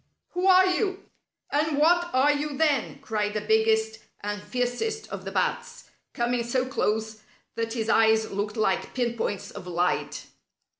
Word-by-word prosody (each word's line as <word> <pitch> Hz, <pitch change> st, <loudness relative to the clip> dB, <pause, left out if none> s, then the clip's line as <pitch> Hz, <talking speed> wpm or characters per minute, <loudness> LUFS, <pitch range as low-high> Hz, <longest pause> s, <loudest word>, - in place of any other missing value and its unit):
"Who 360 Hz, +2 st, 0 dB
are 375 Hz, 0 st, +7 dB
you? 380 Hz, +1 st, -1 dB, 0.4 s
And 300 Hz, 0 st, +1 dB
what 345 Hz, +3 st, +4 dB
are 265 Hz, +3 st, +4 dB
you, 290 Hz, -1 st, -2 dB
then?" 300 Hz, -3 st, +1 dB
cried 210 Hz, -1 st, -2 dB
the 210 Hz, -, 0 dB
biggest 220 Hz, +1 st, +2 dB, 0.2 s
and 205 Hz, 0 st, -4 dB
fiercest 250 Hz, -, -2 dB
of -, -, -7 dB
the -, -, -4 dB
bats, -, -, -2 dB, 0.2 s
coming 240 Hz, 0 st, 0 dB
so 250 Hz, +2 st, 0 dB
close 220 Hz, -4 st, -2 dB, 0.3 s
that 230 Hz, 0 st, -3 dB
his 225 Hz, -2 st, -2 dB
eyes 220 Hz, 0 st, +3 dB
looked 205 Hz, +3 st, -3 dB
like 195 Hz, -3 st, 0 dB
pin 240 Hz, -2 st, 0 dB
points 205 Hz, -3 st, -3 dB
of 190 Hz, -3 st, -9 dB
light. 175 Hz, 0 st, -1 dB
235 Hz, 155 wpm, -26 LUFS, 215-295 Hz, 0.4 s, are